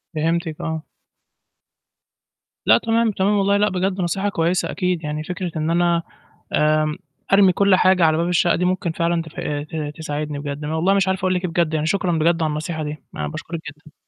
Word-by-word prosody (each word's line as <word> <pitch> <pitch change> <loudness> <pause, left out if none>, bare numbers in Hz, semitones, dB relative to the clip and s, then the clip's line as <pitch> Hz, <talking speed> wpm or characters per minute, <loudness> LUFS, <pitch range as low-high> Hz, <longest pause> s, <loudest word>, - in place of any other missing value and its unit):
فهمتِك، 165 +1 -1
آه. 160 -1 -3 1.8
لأ، - - +6
تمام، 225 -1 +1
تمام، 195 +1 +1
والله 200 +1 +3
لأ، 210 +1 +3
بجد 185 +1 -1
نصيحة 190 +4 0
كويّسة 175 0 0
أكيد، 180 -3 -1
يعني 150 +1 -3
فكرة 180 0 -4
إن 155 +1 -1
أنا 170 -1 +2 0.5
آمم، 155 0 +2 0.4
أرمي 195 -2 +7
كل 200 0 +4
حاجة 185 -1 +4
على 155 0 +3
باب 170 +1 0
الشقة 175 -1 +3
دي 180 - 0
مُمكن 185 -2 0
فعلًا 170 0 0
تف 160 -1 -11 0.4
ت 150 -2 -4
تساعدني 150 -2 -4
بجد. 145 0 -5
أنا 155 +2 -2
والله 185 +5 +2
مش 195 -1 +2
عارف 190 0 0
أقول 185 0 +1
لِك 180 0 -1
إيه - - -2
بجد، 165 -2 0
يعني 155 0 0
شكرًا 180 0 0
بجد 165 +1 +2
على 155 - +1
النصيحة 155 +1 -3
دي، 150 +1 -4 0.2
أنا 75 -1 -3
باشكُرِِك 165 - -6
جدًا. 150 0 -20
170 Hz, 195 wpm, -21 LUFS, 155-185 Hz, 1.8 s, أرمي